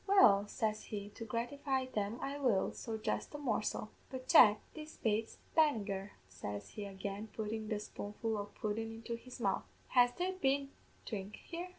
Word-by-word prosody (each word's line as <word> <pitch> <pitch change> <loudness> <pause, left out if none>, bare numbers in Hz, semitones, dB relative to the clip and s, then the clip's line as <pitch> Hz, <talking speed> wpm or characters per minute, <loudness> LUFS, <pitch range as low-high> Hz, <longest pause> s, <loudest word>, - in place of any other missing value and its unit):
"'Well,' 210 - +7
says 215 -1 -1
he, 205 -1 -5
'to 225 - -8
gratify 260 +4 -1
them 215 -3 -2
I 280 +1 -2
will; 235 -9 +2
so 225 -2 -4
just 220 - -2
a - - -2
morsel. 215 -5 -1 0.2
But, 260 -1 -6
Jack, 210 -3 +8
this 310 0 -9
bates 220 0 0 0.2
Bannagher,' 210 -11 +2
says 100 +2 -6
he 205 - -6
again, 200 +2 -5
puttin' 220 0 -2
the 215 -1 0
spoonful 210 +2 -3
o' 205 -1 -2
pudden 220 +2 -3
into 225 +1 -4
his 250 +2 -10
mouth; - - +2 0.3
'has 245 -1 +6
there 365 +1 -1
been 275 -5 +1 0.3
dhrink 200 -2 -4
here?' 345 +2 -6
225 Hz, 170 wpm, -36 LUFS, 205-260 Hz, 0.3 s, Jack